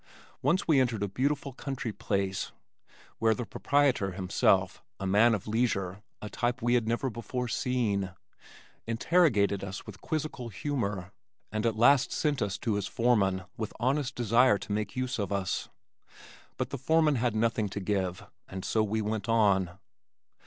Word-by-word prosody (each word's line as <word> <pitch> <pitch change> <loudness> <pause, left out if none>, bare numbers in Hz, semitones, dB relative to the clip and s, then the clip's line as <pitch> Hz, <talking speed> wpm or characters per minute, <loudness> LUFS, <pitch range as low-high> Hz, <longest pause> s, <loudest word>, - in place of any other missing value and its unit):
Once 185 - +1
we 155 -5 +5
entered 115 -5 +1
a - - 0
beautiful 140 +6 -1
country 130 -4 -4
place 95 -1 -2 0.7
where 110 0 +3
the 120 - -4
proprietor 130 -4 +1
himself 90 -1 +1 0.2
(a 100 - -3
man 105 +4 +5
of 100 - -6
leisure, 105 -4 0 0.2
a - - -4
type 120 +3 -1
we 120 0 +1
had 120 -3 +2
never 120 +4 0
before 125 +1 -4
seen) 115 -7 0 0.8
interrogated 115 - +2
us 95 0 -6
with 105 -3 -11
quizzical 150 -6 -3
humor, 105 - -3 0.4
and 110 +1 0
at 110 -1 -1
last 130 +3 +5
sent 145 -5 0
us 100 -2 -1
to 115 - -1
his 100 -1 -1
foreman 100 -6 +2
with 110 -2 -4
honest 135 +2 0
desire 120 -1 +4
to 100 - -8
make 105 -1 -2
use 130 -2 -2
of 100 - -2
us. 100 -2 -2 0.9
But 130 +1 -3
the 140 - -4
foreman 155 +1 +3
had 120 -2 0
nothing 110 -1 +1
to 100 - -4
give, 95 -2 -2 0.2
and 95 -1 -6
so 110 - +1
we 110 +1 0
went 105 0 -3
on. 95 -6 +3
115 Hz, 160 wpm, -29 LUFS, 100-125 Hz, 0.9 s, we